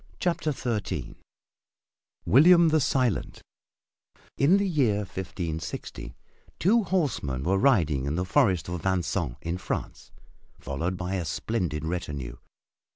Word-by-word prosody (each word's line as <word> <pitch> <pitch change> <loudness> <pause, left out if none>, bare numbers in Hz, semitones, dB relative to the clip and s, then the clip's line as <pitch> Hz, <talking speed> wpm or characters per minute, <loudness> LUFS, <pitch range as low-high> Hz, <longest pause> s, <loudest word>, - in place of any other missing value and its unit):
CHAPTER 170 -3 0
XIII 120 -6 -3 1.1
WILLIAM 170 - +6
THE 155 0 +3
SILENT 130 -6 0 0.9
In 155 +8 +4
the 200 0 +1
year 140 - +2
1560 85 -9 -6 0.4
two 225 +7 +3
horsemen 135 - -1
were 95 +4 +1
riding 80 - +3
in 75 - -1
the 90 +2 -1
Forest 95 - +2
of 90 -1 -4
Vincennes 90 -7 -1
in 85 +2 -3
France, - - -5 0.5
followed 85 +7 -3
by 90 +1 -4
a 90 - -2
splendid 80 -1 -2
retinue. 75 -7 -4
95 Hz, 115 wpm, -27 LUFS, -, 1.1 s, WILLIAM